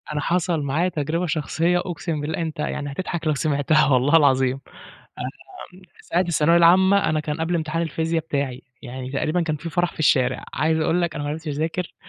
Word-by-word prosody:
أنا 150 Hz, -1 st, -2 dB
حصل 170 Hz, 0 st, 0 dB
معايا 150 Hz, +6 st, 0 dB
تجربة 160 Hz, +2 st, -2 dB
شخصية، 165 Hz, +2 st, 0 dB
أُقسِم 165 Hz, -3 st, -4 dB
بالله 155 Hz, +3 st, -3 dB
أنت 160 Hz, -2 st, -4 dB
يعني 145 Hz, -1 st, -3 dB
هتضحك 170 Hz, +1 st, -4 dB
لو 155 Hz, -, +3 dB
سمعتها 150 Hz, +1 st, +2 dB
والله 135 Hz, +4 st, +4 dB
العظيم. 135 Hz, -3 st, +3 dB, 1.0 s
آمم، 185 Hz, -, -12 dB, 0.2 s
ساعة 175 Hz, -, -1 dB
الثانوية 170 Hz, -2 st, +3 dB
العامة 190 Hz, +4 st, +5 dB
أنا 155 Hz, 0 st, +1 dB
كان 150 Hz, +1 st, -4 dB
قبل 165 Hz, +2 st, -1 dB
امتحان 165 Hz, 0 st, -1 dB
الفيزيا 165 Hz, +1 st, -1 dB
بتاعي، 140 Hz, -4 st, -3 dB, 0.2 s
يعني 130 Hz, 0 st, -7 dB
تقريبًا 155 Hz, +5 st, 0 dB
كان 155 Hz, -2 st, -1 dB
في 165 Hz, +3 st, -7 dB
فرح 175 Hz, 0 st, 0 dB
في -, -, -18 dB
الشارع، 130 Hz, -4 st, +2 dB
عايز 160 Hz, +3 st, +1 dB
أقول 170 Hz, +3 st, +1 dB
لك 170 Hz, -2 st, -1 dB
أنا 145 Hz, -2 st, -4 dB
ما 145 Hz, -, -2 dB
عرفتش 160 Hz, +2 st, -5 dB
أذاكر، 160 Hz, +4 st, -3 dB
160 Hz, 190 wpm, -23 LUFS, 145-170 Hz, 1.0 s, العامة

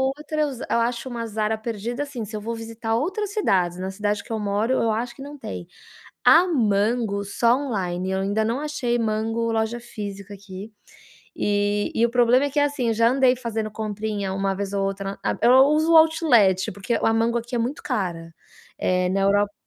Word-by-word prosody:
outra 305 Hz, +1 st, -3 dB
eu 295 Hz, -1 st, +1 dB
za 255 Hz, -, -7 dB
acho 235 Hz, +2 st, 0 dB
uma 235 Hz, -2 st, -4 dB
Zara 220 Hz, 0 st, -1 dB
perdida, 230 Hz, +4 st, -4 dB
assim, 280 Hz, -5 st, -6 dB
se 215 Hz, +2 st, -8 dB
eu 210 Hz, -, -4 dB
vou 230 Hz, +2 st, -4 dB
visitar 225 Hz, 0 st, -4 dB
outras 380 Hz, -, -2 dB
cidades, 180 Hz, -, +1 dB
na 190 Hz, +1 st, -3 dB
cidade 205 Hz, +1 st, -2 dB
que -, -, -12 dB
eu 225 Hz, -, -1 dB
moro 210 Hz, +4 st, 0 dB
eu 230 Hz, -3 st, +1 dB
acho 235 Hz, +3 st, -3 dB
que -, -, -12 dB
não 290 Hz, +1 st, -9 dB
tem, 90 Hz, -, -7 dB, 0.6 s
a 325 Hz, +9 st, +7 dB
Mango 215 Hz, -, +1 dB
só 230 Hz, +4 st, +2 dB
online, 190 Hz, -9 st, -2 dB
eu 190 Hz, 0 st, -1 dB
ainda 205 Hz, +3 st, 0 dB
não 230 Hz, +5 st, -1 dB
achei 290 Hz, -5 st, -1 dB
Mango 225 Hz, +1 st, -1 dB
loja 225 Hz, +1 st, -1 dB
física 205 Hz, -4 st, -8 dB
aqui, 200 Hz, +1 st, -10 dB, 0.6 s
e 205 Hz, 0 st, 0 dB
e 230 Hz, -, +2 dB
o -, -, -6 dB
problema 245 Hz, +3 st, +4 dB
é -, -, -3 dB
que, 290 Hz, -, -2 dB
assim, 290 Hz, -4 st, 0 dB
eu -, -, +2 dB
já 230 Hz, +1 st, +4 dB
andei 260 Hz, -1 st, +3 dB
fazendo 225 Hz, -3 st, -3 dB
comprinha 210 Hz, -2 st, -3 dB
uma 195 Hz, 0 st, -1 dB
vez 200 Hz, 0 st, -4 dB
ou 200 Hz, -1 st, 0 dB
outra, 195 Hz, 0 st, -3 dB
a -, -, 0 dB
eu 240 Hz, +2 st, +6 dB, 0.2 s
uso 310 Hz, +2 st, +2 dB
o -, -, +7 dB
outlet, 245 Hz, -, +4 dB
porque 200 Hz, +5 st, -3 dB
a 225 Hz, -, +3 dB
Mango 230 Hz, +1 st, +1 dB
aqui 235 Hz, +1 st, -7 dB
é -, -, +1 dB
muito 245 Hz, +6 st, -2 dB
cara, 165 Hz, -4 st, -3 dB, 0.4 s
eh, 180 Hz, 0 st, +1 dB
na 195 Hz, +1 st, 0 dB
Europa 205 Hz, +1 st, +2 dB
225 Hz, 205 wpm, -23 LUFS, 200-245 Hz, 0.6 s, a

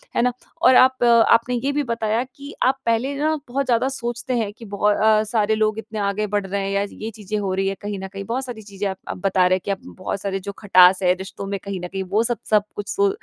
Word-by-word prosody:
है -, -, +3 dB
ना? 250 Hz, +1 st, +2 dB, 0.3 s
और 260 Hz, -7 st, +6 dB
आप 260 Hz, 0 st, +5 dB
आपने 235 Hz, +1 st, +4 dB
ये 275 Hz, -, +1 dB
भी 290 Hz, +1 st, 0 dB
बताया 230 Hz, -2 st, -1 dB
कि 280 Hz, +1 st, -10 dB
आप 265 Hz, +1 st, +3 dB
पहले 230 Hz, +4 st, +1 dB
ना, 310 Hz, +2 st, +1 dB
बहुत 275 Hz, +3 st, -1 dB
ज़्यादा 245 Hz, 0 st, +2 dB
सोचते 240 Hz, -1 st, -4 dB
हैं 220 Hz, -3 st, -1 dB
कि 230 Hz, -, -11 dB
बहु 200 Hz, 0 st, -4 dB
अ, 215 Hz, +1 st, +4 dB
सारे 220 Hz, 0 st, +1 dB
लोग 215 Hz, 0 st, +1 dB
इतने 220 Hz, -1 st, -6 dB
आगे 200 Hz, +1 st, -1 dB
बढ़ 205 Hz, -1 st, -1 dB
रहे 200 Hz, +1 st, -2 dB
हैं 195 Hz, -, -2 dB
या 200 Hz, 0 st, +1 dB
ये 220 Hz, -, -6 dB
चीज़ें 210 Hz, 0 st, -4 dB
हो 195 Hz, -2 st, -2 dB
रही 195 Hz, +1 st, 0 dB
हैं 195 Hz, -, -1 dB
कहीं 205 Hz, -1 st, -4 dB
न 190 Hz, -, -5 dB
कहीं 195 Hz, +1 st, -7 dB
बहुत 250 Hz, +5 st, -2 dB
सारी 240 Hz, -4 st, -7 dB
चीज़ें 200 Hz, -1 st, -4 dB
आप 190 Hz, -, -5 dB
आप -, -, -4 dB
बता 190 Hz, -1 st, +3 dB
रहे 185 Hz, -, +3 dB
हैं 200 Hz, -, +1 dB
कि -, -, -15 dB
बहुत 190 Hz, +1 st, -5 dB
सारे 195 Hz, -1 st, -2 dB
जो 200 Hz, +1 st, -6 dB
खटास 185 Hz, -2 st, +6 dB
है 180 Hz, 0 st, +5 dB
रिश्तों 190 Hz, +1 st, -7 dB
में 200 Hz, 0 st, -3 dB
कहीं 200 Hz, -2 st, -4 dB
न 180 Hz, -, -4 dB
कहीं 190 Hz, +1 st, -4 dB
वो 215 Hz, +3 st, +3 dB
सब 240 Hz, 0 st, -1 dB
सब 210 Hz, -2 st, +4 dB
कुछ 205 Hz, -1 st, -5 dB
सो 405 Hz, 0 st, +2 dB
215 Hz, 270 wpm, -22 LUFS, 195-240 Hz, 0.3 s, और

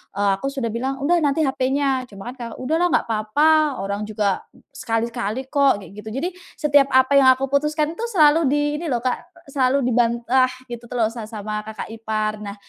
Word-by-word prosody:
eee, 200 Hz, 0 st, +2 dB
aku 275 Hz, -, -4 dB
sudah 255 Hz, -5 st, -2 dB
bilang, 260 Hz, +4 st, -3 dB
"Udah 345 Hz, +5 st, +3 dB
nanti 295 Hz, 0 st, +1 dB
HP-nya." 265 Hz, -1 st, 0 dB
cuma 200 Hz, +2 st, -9 dB
kan -, -, -14 dB
ka 240 Hz, -2 st, -6 dB
"Udah 305 Hz, +6 st, 0 dB
lah 355 Hz, -, +3 dB
nggak -, -, +2 dB
apa-apa, 290 Hz, +5 st, +2 dB
orang 200 Hz, +2 st, -3 dB
juga 210 Hz, -2 st, -1 dB, 0.3 s
sekali-sekali 235 Hz, -1 st, -3 dB
kok." 275 Hz, -8 st, +3 dB
kayak 180 Hz, -, -12 dB
gitu. 210 Hz, +1 st, -8 dB
Jadi 295 Hz, +7 st, -2 dB, 0.3 s
setiap 285 Hz, -2 st, +3 dB
apa 260 Hz, +2 st, +5 dB
yang 260 Hz, -1 st, +7 dB
aku 265 Hz, +1 st, -4 dB
putuskan 300 Hz, +2 st, +1 dB
itu 465 Hz, -, -2 dB
selalu 320 Hz, -5 st, +4 dB
di 295 Hz, +1 st, +1 dB
ini 340 Hz, -, -6 dB
lho 245 Hz, -5 st, -1 dB
Kak, 255 Hz, +8 st, -3 dB, 0.2 s
selalu 270 Hz, 0 st, +1 dB
dibantah 240 Hz, +1 st, +2 dB, 0.2 s
gitu 240 Hz, 0 st, -7 dB
tuh 250 Hz, -, -8 dB
lho 220 Hz, -2 st, +2 dB
sa 225 Hz, -1 st, -7 dB
sama 210 Hz, -1 st, -5 dB
kakak 220 Hz, 0 st, -7 dB
ipar. 215 Hz, -1 st, -3 dB
Nah, 205 Hz, -1 st, -6 dB
255 Hz, 200 wpm, -21 LUFS, 220-285 Hz, 0.3 s, yang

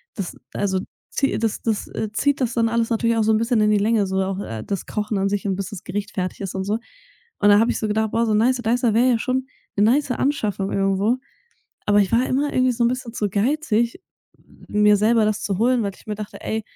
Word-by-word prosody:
das, 195 Hz, -4 st, -5 dB, 0.2 s
also, 190 Hz, -2 st, 0 dB, 0.3 s
zie 275 Hz, -, 0 dB
das 225 Hz, -2 st, -1 dB
das, 220 Hz, -2 st, -1 dB
äh, 215 Hz, -1 st, -4 dB
zieht 285 Hz, +5 st, +1 dB
das 240 Hz, -2 st, 0 dB
dann 230 Hz, -1 st, +2 dB
alles 230 Hz, 0 st, 0 dB
natürlich 230 Hz, 0 st, +1 dB
auch 220 Hz, -, +3 dB
so 220 Hz, -, +3 dB
'n -, -, +4 dB
bisschen 230 Hz, -1 st, +1 dB
in 210 Hz, 0 st, +3 dB
die 210 Hz, -, +4 dB
Länge, 215 Hz, -1 st, +2 dB
so 190 Hz, 0 st, 0 dB
auch, 190 Hz, 0 st, -3 dB
äh, 110 Hz, -, -5 dB
das 195 Hz, -3 st, -4 dB
Kochen 210 Hz, -1 st, -2 dB
an 195 Hz, 0 st, +1 dB
sich 205 Hz, 0 st, -2 dB
und 190 Hz, -, 0 dB
bis 195 Hz, -1 st, -4 dB
das 200 Hz, -, -8 dB
Gericht 200 Hz, +2 st, -4 dB
fertig 185 Hz, +1 st, -4 dB
ist 195 Hz, -, -4 dB
und 190 Hz, -, -2 dB
so. 210 Hz, +2 st, 0 dB, 0.6 s
Und 205 Hz, -, +4 dB
dann 205 Hz, +1 st, +7 dB
habe 230 Hz, +2 st, +3 dB
ich -, -, -3 dB
so 215 Hz, -, -1 dB
gedacht: 220 Hz, 0 st, 0 dB
„Boah, 230 Hz, 0 st, +1 dB
so 215 Hz, -, +1 dB
'n -, -, +3 dB
Nicer 250 Hz, +2 st, +2 dB
Dicer 235 Hz, 0 st, +2 dB
wäre 245 Hz, +3 st, +4 dB
ja 230 Hz, -, +2 dB
schon 260 Hz, +1 st, -1 dB, 0.3 s
'ne 205 Hz, -, +4 dB
nice 265 Hz, +4 st, +3 dB
Anschaffung 215 Hz, -8 st, -1 dB
irgendwo.“ 195 Hz, +5 st, +1 dB, 0.7 s
Aber 205 Hz, 0 st, +4 dB
ich 190 Hz, -, 0 dB
war 245 Hz, +3 st, +3 dB
immer 285 Hz, +3 st, 0 dB
irgendwie 255 Hz, 0 st, +3 dB
so 235 Hz, 0 st, 0 dB
'n -, -, +4 dB
bisschen 250 Hz, -2 st, -4 dB
zu 210 Hz, -3 st, -1 dB
geizig, 235 Hz, -, 0 dB, 0.7 s
mir 210 Hz, 0 st, +4 dB
selber 220 Hz, +2 st, +3 dB
das 215 Hz, 0 st, 0 dB
zu 195 Hz, -2 st, -2 dB
holen, 245 Hz, +1 st, +3 dB
weil 200 Hz, -1 st, -2 dB
ich -, -, -20 dB
mir 210 Hz, -, -3 dB
dachte: 210 Hz, -1 st, -8 dB
„Ey“ 220 Hz, 0 st, -2 dB
220 Hz, 255 wpm, -22 LUFS, 205-235 Hz, 0.7 s, dann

